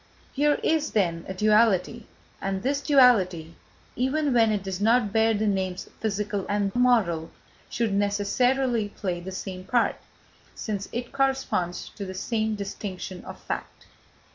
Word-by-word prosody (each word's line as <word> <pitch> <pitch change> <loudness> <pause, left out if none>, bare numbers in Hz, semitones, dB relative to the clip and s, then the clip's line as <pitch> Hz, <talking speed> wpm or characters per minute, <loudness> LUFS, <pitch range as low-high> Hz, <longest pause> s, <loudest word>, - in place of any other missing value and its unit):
Here 295 +1 +2
is, 315 -1 +1
then, 170 -5 0
a 190 - -4
duality, 215 +1 +2 0.3
and 195 0 -2
this 280 +2 0
duality, 195 - +4 0.4
even 275 +3 0
when 225 -2 +4
it 205 -2 -1
does 190 0 -4
not 225 -1 +3
bear 225 0 +3
the 215 +1 0
names 190 -3 -1
physical 210 -2 -2
and 200 -1 0
moral, 220 -10 +2 0.4
should 225 -3 -1
necessarily 210 +4 +1
play 185 -4 -4
the 185 +2 -7
same 185 -1 -6
part, 235 +5 +1 0.6
since 200 -3 -4
it 240 0 -4
corresponds 270 -10 -1
to 205 - -8
the 185 - -6
same 220 +2 -1
distinction 195 -2 -6
of - - -9
fact. - - -6
210 Hz, 140 wpm, -26 LUFS, 190-240 Hz, 0.6 s, duality